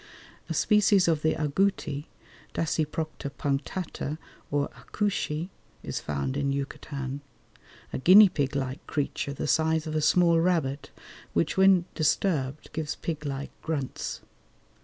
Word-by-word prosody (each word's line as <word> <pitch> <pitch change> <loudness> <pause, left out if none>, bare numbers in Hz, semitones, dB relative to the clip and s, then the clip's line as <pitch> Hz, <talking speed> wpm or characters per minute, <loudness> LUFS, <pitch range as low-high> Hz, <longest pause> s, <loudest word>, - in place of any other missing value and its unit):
A - - -2
species 205 -3 +4
of 160 -3 +2
the 155 - +2
agouti 150 -2 0 0.5
(Dasyprocta 155 -2 -2
punctata 145 +2 -3 0.3
or 145 0 0
acouchy) 180 -5 -2 0.3
is - - -3
found 70 -3 -3
in 140 -1 0
Yucatan, 140 0 -4 0.7
a - - -2
guinea 195 +9 +9
pig 145 -6 -1
like 135 0 -3
creature, 145 -1 -2
the 140 - -4
size 160 +1 +2
of 155 - -4
a 155 - +1
small 170 +1 +4
rabbit, 160 -5 0 0.4
which 85 - +1
when 190 -2 +5
disturbed 155 -3 0
gives 155 -1 -2
pig 155 -3 -4
like 140 0 -4
grunts. 145 -5 -3
155 Hz, 125 wpm, -27 LUFS, 140-170 Hz, 0.7 s, guinea